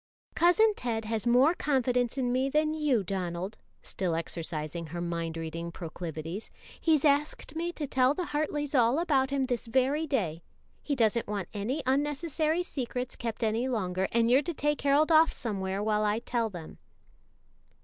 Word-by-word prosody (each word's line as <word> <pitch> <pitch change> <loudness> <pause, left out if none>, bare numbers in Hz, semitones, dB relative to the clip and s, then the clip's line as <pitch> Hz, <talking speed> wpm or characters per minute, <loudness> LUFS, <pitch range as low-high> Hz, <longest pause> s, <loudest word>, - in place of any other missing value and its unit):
"Cousin 425 +6 +4
Ted 225 - -3
has 225 +1 -2
more 255 +7 +5
confidence 250 -5 0
in 250 -2 0
me 260 +2 +1
than 305 +2 +2
you, 295 -9 +1
Donald," 185 +2 -4 0.2
still 180 -4 -1
exercising 165 0 -4
her 170 +3 -6
mind 170 -1 -3
reading 165 +1 -5
proclivities. 165 +2 -6 0.3
"He's 315 -3 +3
asked 290 +1 +1
me 340 +2 -2
to 305 - -4
tell 260 +1 +2
the 360 - -2
Hartleys 295 -1 -2
all 245 0 +4
about 280 -6 +2
him 275 -1 0
this 245 -2 -2
very 265 +6 +1
day. 180 - -1 0.4
He 290 - -1
doesn't 230 -1 +2
want 200 -3 -3
any 240 +9 -2
unnecessary 295 +4 0
secrets 250 -5 -4
kept 230 0 -4
any 225 +3 +1
longer, 190 -6 -1
and 230 0 +3
you're 260 +3 +6
to 330 +3 -4
take 295 +1 0
Harold 285 +3 +3
off 320 +1 +6
somewhere 195 -3 -3
while 215 0 +1
I 210 0 +1
tell 230 -1 -1
them." 175 -5 -10
245 Hz, 165 wpm, -29 LUFS, 195-290 Hz, 0.4 s, you're